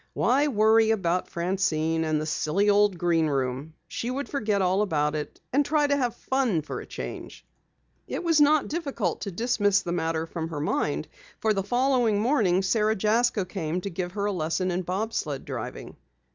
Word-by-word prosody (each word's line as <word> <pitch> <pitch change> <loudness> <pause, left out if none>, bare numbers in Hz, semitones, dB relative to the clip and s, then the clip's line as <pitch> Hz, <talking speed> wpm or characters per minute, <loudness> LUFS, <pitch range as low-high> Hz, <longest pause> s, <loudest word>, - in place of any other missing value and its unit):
Why 280 +4 +2
worry 220 -2 +4
about 185 -5 0
Francine 165 -3 0
and 155 -1 +1
the 155 - -3
silly 175 +6 +1
old 205 -2 +3
Green 165 -2 +2
Room? 135 +2 -2
She 235 - -4
would 275 +3 -3
forget 215 -7 0
all 190 +1 +2
about 150 -7 0
it 150 -1 -5
and 285 +2 +4
try 295 +1 +2
to 285 0 +2
have 250 -4 -1
fun 250 - 0
for - - -5
a - - -11
change. - - -8 0.6
It - - -4
was 330 -3 +3
not 295 0 +4
difficult 275 - -2
to 200 - -4
dismiss 205 -1 +1
the 170 - -3
matter 165 -1 -1
from 165 -1 -5
her 155 -3 -4
mind, 150 0 -1 0.3
for 220 -1 +1
the 195 - 0
following 245 0 +2
morning 210 -7 +2
Sara 215 +2 +2
Jasko 215 0 +1
came 175 -2 -3
to 200 - -5
give 175 +1 -4
her 200 0 -2
a 205 - +1
lesson 180 +1 -1
in 180 +1 -1
bob 195 +5 -3
sled 145 -4 -3
driving. - - -6
195 Hz, 185 wpm, -26 LUFS, 165-230 Hz, 0.6 s, worry